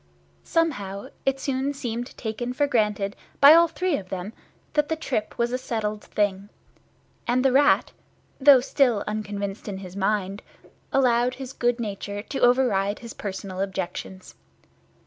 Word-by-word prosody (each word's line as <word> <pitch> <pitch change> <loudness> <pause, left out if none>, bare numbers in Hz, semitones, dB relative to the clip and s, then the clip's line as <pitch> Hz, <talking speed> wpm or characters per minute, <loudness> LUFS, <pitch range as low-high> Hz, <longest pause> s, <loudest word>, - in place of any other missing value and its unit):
Somehow, 245 -10 -1 0.2
it 270 0 +2
soon 275 +1 -1
seemed 240 -1 -5
taken 240 +2 -4
for 290 +3 +2
granted 210 -6 0 0.2
by 285 +2 +10
all 335 +1 +7
three 360 -1 -1
of 185 -2 -9
them 190 +3 -5 0.4
that 300 -1 +1
the 320 - +1
trip 255 -9 -3
was 235 0 0
a 255 - -1
settled 215 -4 -3
thing; 200 -1 -1 0.8
and 255 +2 +2
the 265 - +5
Rat, 285 +3 +4 0.5
though 270 -2 +8
still 245 -5 +2
unconvinced 205 -1 -4
in 200 -2 -4
his 185 -1 -9
mind, 200 0 -1 0.5
allowed 250 -1 +3
his 265 -1 -7
good 240 -1 0
nature 205 -2 -4
to 270 - -5
over 250 +2 +5
ride 200 -2 0
his 235 -1 -9
personal 190 -1 -5
objections. 190 -1 -5
230 Hz, 150 wpm, -25 LUFS, 200-265 Hz, 0.8 s, by